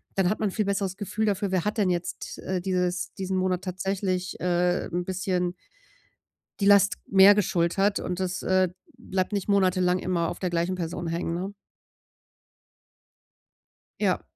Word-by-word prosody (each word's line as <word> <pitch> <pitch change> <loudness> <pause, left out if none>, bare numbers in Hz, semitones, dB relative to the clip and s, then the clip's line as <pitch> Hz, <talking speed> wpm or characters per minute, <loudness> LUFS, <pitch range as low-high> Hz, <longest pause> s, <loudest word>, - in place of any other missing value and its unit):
dann 190 -2 +2
hat 215 - -1
man 210 - +2
'n - - -7
viel 215 +2 -1
besseres 195 -1 -1
Gefühl 215 +1 -2
dafür, 200 -1 0
wer 185 -3 +1
hat 210 +2 -1
denn 200 -4 +2
jetzt, 175 -1 -3
äh, 185 -1 -2
dieses 180 -1 -1
diesen 190 0 -3
Monat 185 -1 0
tatsächlich, 185 -1 -2
äh, 180 0 +1
'n 175 +1 -2
bisschen 180 -1 -1 1.1
die 200 - +2
Last 200 0 +5
mehr 195 +1 +7
geschultert 195 0 +1
und 180 0 -4
das, 185 0 -2
äh, 185 0 +3 0.3
bleibt 190 -4 -2
nicht 200 -1 -2
monatelang 185 -2 +3
immer 170 -2 -1
auf - - -5
der 185 - -2
gleichen 175 +2 0
Person 170 0 -4
hängen, 165 0 -2
ne? 185 +3 -4 2.5
Ja. - - +1
185 Hz, 160 wpm, -26 LUFS, 180-195 Hz, 2.5 s, mehr